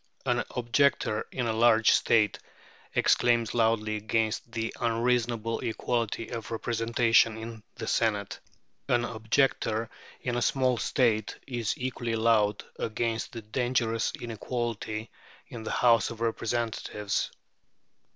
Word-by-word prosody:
An - - +1
objector 120 -2 +1
in 125 - -2
a 115 - 0
large 115 0 +5
state 110 -2 +3 0.6
exclaims 120 -2 +3
loudly 110 -2 +1
against 110 +1 -1
the 115 0 -3
unreasonable 115 -1 0
equality 115 -1 -2
of 115 -2 -5
representation 115 0 +2
in 110 0 -7
the 115 - -5
Senate. 105 -3 0 0.5
An 120 -1 +3
objector 115 0 0 0.3
in 120 -1 -2
a - - 0
small 130 +1 +2
state 110 -5 +1
is 120 -5 -2
equally 125 -2 -2
loud 110 -2 +2 0.2
against 115 0 -2
the 115 -2 -7
dangerous 115 0 0
inequality 115 -1 -4 0.4
in 115 - -7
the 110 - -5
House 115 -3 +4
of 115 - -8
Representatives. 115 -3 -1
115 Hz, 115 wpm, -28 LUFS, 110-120 Hz, 0.6 s, large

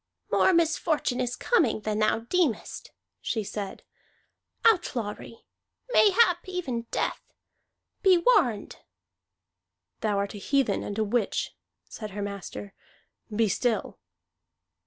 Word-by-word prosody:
"More - - +4
misfortune 315 -6 +1
is 245 -1 -1
coming 315 - +2
than 215 0 -2
thou 215 +1 +2
deemest," 275 - -1 0.3
she 220 - -2
said. 200 -1 -6 0.8
"Outlawry. 235 - 0 0.5
Mayhap 395 -5 +5
even 260 -11 -3
death. - - -1 0.8
Be 380 -3 +6
warned!" 340 - +2 1.2
"Thou 210 -2 0
art 200 0 -2
a 205 - -7
heathen 275 +5 +1
and 205 - -5
a 220 - +2
witch," 215 0 -1 0.3
said 215 -2 -7
her - - -2
master. 200 0 -6 0.6
"Be 220 +1 +1
still!" 225 +4 -1
235 Hz, 110 wpm, -27 LUFS, 210-340 Hz, 1.2 s, Be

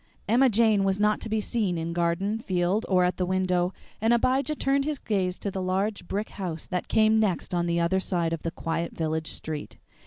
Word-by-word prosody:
Emma 250 +5 +5
Jane 220 -2 +3
was 195 0 +1
not 210 0 +2
to 225 - -4
be 220 0 +1
seen 210 -5 -1
in 165 +1 -3
garden, 175 +5 0
field, 185 +1 0
or 185 -2 +4
at 180 0 +1
the 185 - 0
window, 185 -1 +1 0.3
and 225 +2 +3
Abijah 260 +5 +1
turned 275 0 +1
his 300 0 -2
gaze 185 -6 -1
to 200 - -3
the 190 - -3
large 190 +1 -1
brick 210 +2 -2
house 175 -5 -5
that 180 -1 -3
came 220 0 +4
next 190 -5 0
on 175 -1 +1
the 170 0 +1
other 170 +3 +2
side 170 -3 -1
of 165 - -3
the 165 - -2
quiet 165 +1 -3
village 160 -1 -1
street. 155 -2 -6
190 Hz, 215 wpm, -26 LUFS, 170-220 Hz, 0.3 s, Emma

